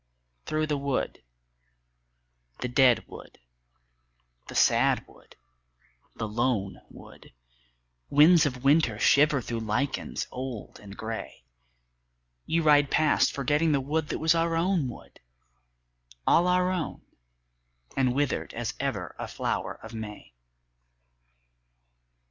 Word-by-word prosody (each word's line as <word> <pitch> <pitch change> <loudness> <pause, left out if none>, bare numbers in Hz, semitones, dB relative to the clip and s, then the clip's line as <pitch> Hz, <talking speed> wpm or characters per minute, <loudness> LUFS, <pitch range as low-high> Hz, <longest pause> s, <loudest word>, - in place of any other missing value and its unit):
Through 155 0 0
the 150 -2 -2
wood, 140 -2 -2 1.4
the - - -3
dead 125 -1 +3
wood, - - -12 1.1
the - - -9
sad - - +3
wood, - - -20 0.8
the 110 - -4
lone 110 -3 -1
wood, - - -15 0.8
Winds 155 +2 +6
of 125 -2 -6
winter 140 -6 +3
shiver 140 +4 +4
through 115 0 -4
lichens 125 +5 -2
old 125 -4 -7
and 100 -1 -12
grey, 110 - -6 1.0
You 165 0 +1
ride 145 -2 +5
past 155 -1 +3
forgetting 150 +4 +1
the 140 - +2
wood 150 +3 -2
that - - -2
was 160 +1 +3
our 165 0 0
own 170 -3 +1
wood, 120 - -11 1.1
All 175 +2 +4
our 180 0 +2
own 180 -4 -4 0.9
and 130 -2 +1
withered 145 -1 -1
as 120 0 -3
ever 130 -10 -3
a - - -4
flower - - -3
of - - -10
May. 105 - -8
140 Hz, 115 wpm, -27 LUFS, 120-155 Hz, 1.4 s, Winds